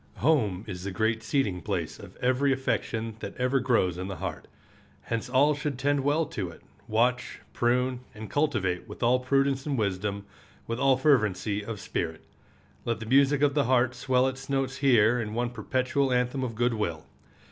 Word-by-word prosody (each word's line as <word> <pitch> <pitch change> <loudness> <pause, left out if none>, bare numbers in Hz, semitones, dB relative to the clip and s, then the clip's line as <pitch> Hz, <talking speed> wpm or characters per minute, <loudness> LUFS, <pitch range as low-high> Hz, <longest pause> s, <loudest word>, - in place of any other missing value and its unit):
Home 110 - +1
is 90 -3 -6
the 100 - -3
great 110 +3 0
seeding 110 -6 0
place - - -3
of - - -12
every 130 +2 +2
affection 115 -4 -2
that 100 - -7
ever 125 +2 +2
grows 110 -9 +1
in 95 - -4
the 95 - -5
heart. - - -5 0.6
Hence 115 +2 -3
all 140 +4 +4
should 145 -2 -3
tend 145 +2 +1
well 145 +4 +1
to 105 - -4
it, 85 - -14 0.2
watch, 125 +3 0
prune, 125 +1 +1 0.2
and 110 0 -7
cultivate 110 - 0
with - - -7
all 125 +2 +4
prudence 135 +1 +1
and 140 -2 0
wisdom, 100 -1 -2 0.4
with 115 +1 -3
all 135 -1 +4
fervency 105 -7 +2
of 110 -1 -6
spirit. 80 -4 -4 0.6
Let 115 -2 -2
the 110 - -6
music 140 +4 +4
of 145 -1 +4
the 145 -2 +2
heart 130 0 +3
swell 130 +1 +2
its 135 +1 -6
notes 135 -1 -1
here 120 -3 +4
in 105 -1 -5
one 120 0 -1
perpetual 130 +4 0
anthem 125 +2 0
of 115 -3 -3
good 120 +1 +1
will. 85 -8 -3
125 Hz, 180 wpm, -27 LUFS, 105-135 Hz, 0.6 s, all